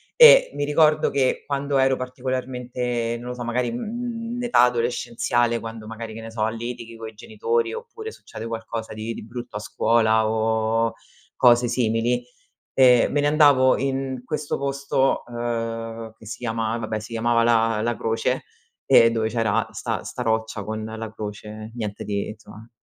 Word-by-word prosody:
e - - +9
mi 145 - -2
ricordo 155 +1 +3
che 130 -2 +1
quando 140 0 -1
ero 135 0 +3
particolarmente 125 -2 -3
non 125 +1 -7
lo - - -3
so, 120 - -5
magari, 120 0 -1
mhmm, 230 - -4
in 245 - -3
età 240 - +4
adolescenziale 120 0 +1
quando 115 -1 -8
magari, 115 0 -7
che 115 - -8
ne 115 0 -8
so, 110 -1 0
litighi 115 0 -6
coi 110 -1 -8
genitori 455 - -1
oppure 460 -1 -7
succede 115 +1 -9
qualcosa 115 0 -5
di 110 +2 -4
di - - -8
brutto 120 -1 -7
a - - -4
scuola 110 +1 +2
o 110 +1 +1 0.4
cose 120 0 +5
simili, 120 +1 +1 0.5
ehm, 125 -2 +6
me 145 - +2
ne 145 - +2
andavo 145 -4 +5
in 135 -1 -2
questo 150 +2 -3
posto, 140 -1 0
ehm, 115 -1 -4
che 110 - -15
si 110 - -6
chiama 115 -1 -2
vabbè, 110 -1 -3
si 110 +2 -10
chiamava 115 +1 +2
la 115 -2 +3
la 120 +1 0
croce 115 +1 -1 0.4
e 115 0 +7
dove 110 -1 0
c'era 115 -1 0
'sta - - -3
'sta 125 - -5
roccia 110 -2 -1
con 110 +1 -4
la 110 0 -6
croce, 110 0 -7
niente 105 -3 -4
di 100 -1 -2
insomma, 110 +1 -13
115 Hz, 165 wpm, -23 LUFS, 110-130 Hz, 0.5 s, e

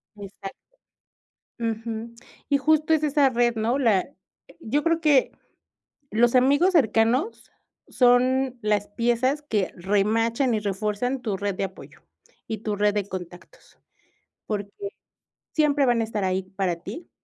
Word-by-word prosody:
Exacto. 195 -1 -9 1.0
Ujú. 230 0 -4 0.3
Y 285 - +3
justo 310 +2 +2
es 315 -1 +3
esa 290 -2 +3
red, 240 -1 +2
¿no?, 230 +5 0
la 220 -8 +2 0.5
yo 290 +4 -1
creo 330 0 +2
que, 295 -5 +3 0.8
los 235 +3 +2
amigos 285 +9 +4
cercanos 250 - +1 0.4
son 255 +1 +3
las 210 -2 0
piezas 240 +6 0
que 215 -10 -1
remachan 225 +7 +1
y 215 - 0
refuerzan 210 +5 -2
tu 210 -5 -2
red 200 0 -2
de 190 - -2
apoyo, 190 -1 -10 0.5
y 220 - -3
tu 210 0 -3
red 205 0 +2
de 205 -2 -2
contactos. 180 -1 -10 0.7
Porque, 205 -2 -3 0.8
siempre 290 -2 +3
van 240 -2 +2
a - - +1
estar 215 -2 -3
ahí 185 0 0
para 190 -2 -2
ti 335 - -8
230 Hz, 135 wpm, -24 LUFS, 205-265 Hz, 1.0 s, amigos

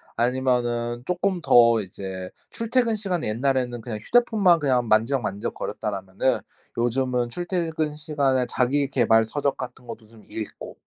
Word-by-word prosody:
아니면은 120 -1 0
쪼끔 180 0 -1
더 115 -7 +5
이제 95 -1 -7 0.2
출퇴근 230 0 0
시간이 190 -6 -2
옛날에는 125 +1 0
그냥 110 -2 -5
휴대폰만 215 - +3
그냥 130 -5 +1
만지작만지작 110 -2 +1
거렸다라면은 100 +4 -2 0.4
요즘은 125 0 0
출퇴근 165 -1 -2
시간에 140 -4 0
자기계발 125 -4 +2
서적 140 +4 -1
같은 130 0 -8
것도 110 -1 -9
좀 110 -1 -18
읽고 110 -2 -7
125 Hz, 335 characters per minute, -24 LUFS, 115-155 Hz, 0.4 s, 더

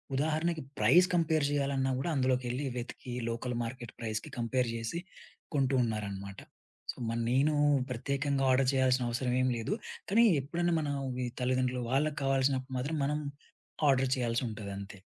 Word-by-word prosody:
ఉదాహరణకి 155 +3 0 0.2
price 180 +2 +6
compare 160 -3 +2
జేయాలన్నా 140 -2 +1
గూడా 170 - -1
అందులోకెళ్లి 130 0 0
వెతికి 125 +1 -6 0.2
లోకల్ 120 +1 -3
మార్కెట్ 120 0 -6
ప్రైజ్‌కి 110 -2 -4
కంపేర్ 120 +1 0
జేసి 115 +9 -3 0.6
కొంటూ 135 -1 +2
ఉన్నారనమాట. 100 -3 -4 0.5
సో, - - -18
మన్ 115 0 -1
నేను 140 +4 +3 0.4
ప్రత్యేకంగా 140 +3 -1
ఆర్డర్ 130 0 +3
చేయాల్సిన 130 -1 +3
అవసరం 125 +1 -1
ఏమీ 130 0 +2
లేదు. 115 - -2 0.4
కానీ 230 +4 +5 0.2
ఎప్పుడైనా 170 +5 0
మన 150 -2 -2 0.2
ఓన్లీ 125 -1 -2 0.2
తల్లిదండ్రులు 125 0 +1
వాళ్ళకి 145 +3 +1
కావాల్సినప్పుడు 135 -1 +1
మాత్రం 150 +5 -2
మనం 150 +2 0 0.7
ఆర్డర్ 130 -1 +3
చేయాల్సి 120 -1 0
ఉంటదంతే. 100 -2 -7
130 Hz, 140 wpm, -31 LUFS, 120-140 Hz, 0.7 s, price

